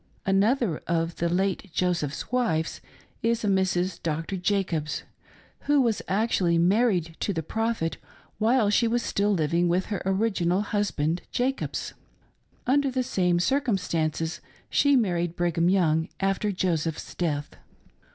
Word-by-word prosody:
Another 200 - +2
of 165 0 -1
the 170 - 0
late 190 +2 0
Joseph's 175 -1 -1
wives 220 -11 0 0.4
is 230 -1 0
a - - 0
Mrs. 190 -1 +1
Doctor 165 +4 -2
Jacobs, 180 -5 -1 0.6
who 290 0 +4
was 235 -5 +2
actually 190 -4 +2
married 180 -2 +2
to - - -1
the 165 -4 -2
Prophet 225 -2 -1 0.4
while 225 -1 +3
she 230 +3 +3
was 235 +1 0
still 205 -1 +1
living 170 -1 +1
with 180 +2 +1
her 200 - -2
original 190 -2 +1
husband, 185 -6 -1
Jacobs. 260 +2 -2 0.7
Under 275 +2 +3
the 255 0 -1
same 180 -6 +1
circumstances 180 - 0 0.3
she 285 -1 +4
married 175 -8 +1
Brigham 170 0 +1
Young, 160 -3 +2
after 195 +2 0
Joseph's 165 -4 -2
death. 150 -4 -2
190 Hz, 130 wpm, -26 LUFS, 170-220 Hz, 0.7 s, who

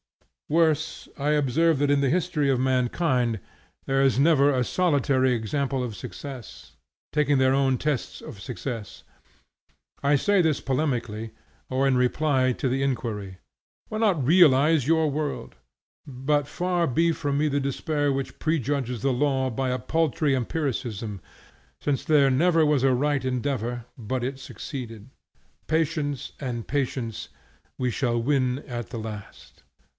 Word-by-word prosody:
Worse, 160 0 +1
I 145 +1 -1
observe 150 +2 +2
that 145 +1 +2
in 140 -1 +3
the 135 - +2
history 160 -3 +1
of 130 -2 +2
mankind 125 - +1 0.5
there 135 0 +1
is 135 -2 +3
never 145 -1 +5
a 125 -2 +1
solitary 140 -7 +2
example 130 +4 -1
of 120 -4 -4
success, 130 0 -9 0.4
taking 145 -1 +3
their 130 0 +4
own 135 -1 +2
tests 145 -3 -2
of 100 - -10
success. 120 -3 -6 1.0
I 145 +1 +4
say 200 +6 +3
this 160 -4 +1
polemically, 120 -6 -2 0.4
or 130 +1 +1
in 135 - +3
reply 130 +1 +2
to 135 - -2
the 135 +2 0
inquiry, 110 -8 -3 0.5
Why 215 - -3
not 190 - +2
realize 150 -3 +5
your 160 -1 +3
world? 150 0 -3 0.5
But 140 +2 -1
far 175 0 0
be 165 +6 +2
from 145 -2 -2
me 150 +1 +2
the 145 -1 0
despair 145 +2 -1
which 135 -1 -4
prejudges 140 -6 -1
the 135 -1 +2
law 135 0 +1
by 130 +3 -1
a 125 0 -1
paltry 155 +2 +1
empiricism; 120 - -3 0.6
since 140 -3 -1
there 145 -3 +4
never 165 +4 +3
was 150 -3 +2
a 135 -1 +4
right 145 +2 +1
endeavor 125 -2 -2
but 120 +2 -3
it 130 +2 -3
succeeded. 125 -4 -8 0.6
Patience 155 -3 -1
and 120 -4 -4
patience, 130 -5 -2 0.5
we 125 -1 0
shall 120 0 0
win 130 0 +1
at 120 -3 -5
the 115 - -5
last. 105 -2 -9
135 Hz, 145 wpm, -25 LUFS, 125-150 Hz, 1.0 s, never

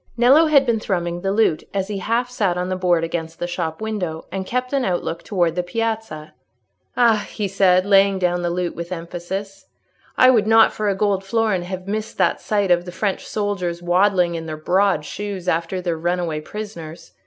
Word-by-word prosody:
Nello 270 +7 +6
had 280 -3 +5
been 235 -3 +1
thrumming 175 -4 -2
the 195 +1 -1
lute 200 -7 +2
as 190 -1 -1
he 205 -2 -4
half 230 +5 0
sat 200 -8 -1
on 180 +1 -2
the 185 - -1
board 175 -2 +1
against 165 -1 -4
the - - -3
shop 170 -1 -4
window, 185 -8 -3
and 190 -1 -4
kept 250 +2 -2
an 275 -2 +1
outlook 175 -4 -2
towards 175 -5 0
the 180 - +1
piazza. 220 -5 -4 0.6
"Ah," 225 -3 +3
he 210 -2 -3
said, 185 -1 +3
laying 195 -1 +4
down 180 -1 0
the 175 - -1
lute, 175 0 -2
with 170 +1 -6
emphasis, 185 +3 -6 0.5
"I 255 0 +7
would 220 -4 +2
not 225 0 +6
for 210 -1 -1
a 195 - 0
gold 195 -1 0
florin 210 -2 0
have 185 +1 -6
missed 215 +2 -4
that 185 -3 +1
sight 205 -3 0
of 175 0 +3
the 180 - -7
French 195 +1 -2
soldiers 180 -5 -3
waddling 180 0 +2
in 165 -1 -5
their 155 -1 -5
broad 180 0 +1
shoes 200 0 -6
after 170 +2 0
their 170 -3 -2
runaway 170 -2 -1
prisoners! 170 -4 -8
185 Hz, 200 wpm, -21 LUFS, 175-210 Hz, 0.6 s, I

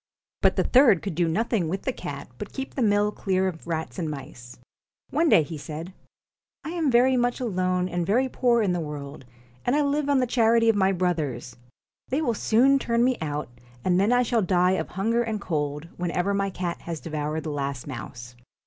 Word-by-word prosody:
But - - +4
the - - +2
third 245 - +5
could 195 - -3
do 170 +1 +1
nothing 205 0 0
with 190 +3 -3
the 260 - -1
cat - - -7
but - - -6
keep 270 0 -6
the 265 - -3
mill 205 -1 +3
clear 190 -2 0
of 165 -3 -6
rats 160 +2 -3
and 165 -3 -2
mice. 130 -4 -9 0.5
One 320 +3 +2
day 160 - +6
he 155 0 -7
said: 155 +5 -7 0.3
' - - -69
I - - -4
am 335 -4 0
very 255 +1 +4
much 245 0 +1
alone 185 -6 0
and 175 -1 -2
very 240 +9 +2
poor 240 -3 +2
in 190 -3 +1
the 175 - -1
world, 145 -3 -7 0.4
and 245 - +1
I 300 - +3
live 285 0 0
on 285 - +4
the 255 - +2
charity 230 -1 +3
of 225 - +4
my 190 -1 +3
brothers. 160 -10 -2 0.5
They 270 - 0
will 285 -7 +1
soon 255 +6 +3
turn 235 -2 +1
me 255 0 +3
out, 150 -3 -3 0.4
and 180 0 +3
then 200 +4 +3
I 245 0 +4
shall 235 -1 +1
die 180 -1 +3
of 190 - -1
hunger 225 +6 0
and 220 -2 -2
cold, 150 -3 -3
when 175 -1 -2
ever 180 +4 0
my 195 0 0
cat 180 -2 -4
has 170 -2 -5
devoured 155 0 -3
the 155 - -4
last 140 -3 -3
mouse.' 125 -2 -8
190 Hz, 215 wpm, -25 LUFS, 160-235 Hz, 0.5 s, day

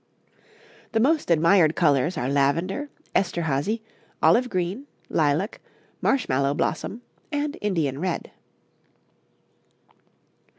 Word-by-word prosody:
'The 225 - +2
most 295 - +2
admired 165 0 +4
colours 155 +1 +2
are 125 - -1
lavender, 165 - 0 0.2
Esterhazy, 175 +3 0 0.4
olive 250 +1 +4
green, 185 +9 -2 0.2
lilac, 155 +6 0 0.4
marshmallow 140 - +1
blossom, 215 +10 -2 0.3
and 290 0 -1
Indian 160 -10 -1
red. 180 0 -3
175 Hz, 85 wpm, -25 LUFS, 145-225 Hz, 0.4 s, admired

